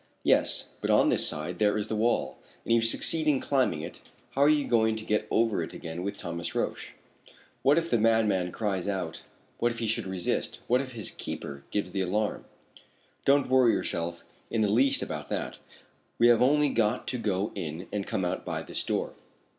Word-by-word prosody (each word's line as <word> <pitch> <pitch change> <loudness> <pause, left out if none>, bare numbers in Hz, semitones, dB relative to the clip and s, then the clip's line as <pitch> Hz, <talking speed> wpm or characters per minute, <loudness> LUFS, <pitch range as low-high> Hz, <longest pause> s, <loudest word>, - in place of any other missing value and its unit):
"Yes, - - +2 0.2
but - - -2
on - - +5
this - - +2
side 80 +4 -3
there 105 0 +3
is 105 0 -2
the 110 - -2
wall, 115 +3 0 0.3
and - - -2
if - - +6
you - - +2
succeed 155 +7 +1
in 145 -3 +4
climbing 130 - +1
it, - - -8 0.3
how 135 - -1
are 145 - +6
you 150 -2 +3
going 110 -2 +3
to 110 0 -6
get 105 - 0
over 115 -5 +2
it 80 - -5
again 80 +1 -6
with 100 +2 -4
Thomas 85 0 -5
Roch? - - -2 0.7
What 140 +4 +4
if 165 0 +1
the 120 - +3
madman 105 -5 +2
cries 100 -3 -2
out 95 -5 -3 0.4
what 120 - +2
if 115 - -7
he 115 - -2
should 110 -3 -1
resist 95 -2 -2
what 125 +2 +3
if 130 -2 -7
his 110 -3 -4
keeper 70 -1 -6
gives 100 -3 -2
the 95 - -1
alarm?" 105 +4 -1 0.8
"Don't 140 0 +4
worry 130 -2 +5
yourself 85 0 -2 0.3
in 115 - 0
the 105 - +2
least 130 +6 +3
about - - -5
that. - - -3 0.6
We 120 +1 +6
have 120 -2 +5
only 145 +3 +4
got 115 -1 +1
to 125 - -2
go 100 -2 -1
in 80 +2 -5
and 100 -2 -2
come 95 - -1
out 90 +1 -2
by - - -3
this - - -2
door." - - -2
110 Hz, 205 wpm, -28 LUFS, 95-120 Hz, 0.8 s, if